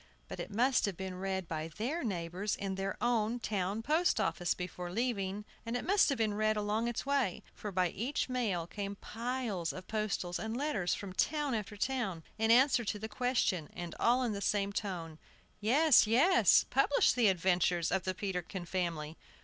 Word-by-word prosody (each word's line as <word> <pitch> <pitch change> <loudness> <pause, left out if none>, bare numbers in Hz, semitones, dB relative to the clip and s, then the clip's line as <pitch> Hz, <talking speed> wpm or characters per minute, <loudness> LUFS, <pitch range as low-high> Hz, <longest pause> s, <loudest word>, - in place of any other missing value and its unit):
But - - -7
it - - -5
must 245 +6 +2
have 195 -4 -3
been 190 -1 -5
read 190 -2 -2
by 160 -1 -3
their 240 - -3
neighbors 185 -1 -2
in 195 -1 -3
their 195 +1 -3
own 235 -1 +1
town 205 -1 -2
post 315 +1 +2
office 175 -4 0
before 180 0 -5
leaving; 210 -2 -2 0.2
it 240 +1 -3
must 400 0 +4
have 275 - 0
been 220 -2 +1
read 215 +1 +1
along 210 +2 0
its 240 +1 -3
way: 275 -9 0
for 210 - -6
by 180 -1 +1
each 245 - -2
mail 225 -10 -1
came 200 +3 -5
piles 230 -6 -3
of 185 - -9
postals 205 -5 -2
and 220 +2 -3
letters 250 - 0
from 195 -2 -7
town 295 +5 0
after 210 -1 -4
town, 210 -9 -2 0.2
in 225 0 +2
answer 255 +1 +5
to 210 -1 -2
the 220 +2 -5
question, 220 - 0
and 175 -2 -5
all 245 +2 +3
in 235 -3 0
the 200 - -4
same 200 0 0
tone: 170 -7 -4 0.4
"Yes, 255 +4 +5
yes; 290 - +5
publish 275 +1 +4
the 240 -3 +3
adventures 180 -2 +2
of 190 - +2
the 185 0 -3
Peterkin 180 -2 -4
family." 165 -4 -3
210 Hz, 180 wpm, -33 LUFS, 185-240 Hz, 0.4 s, answer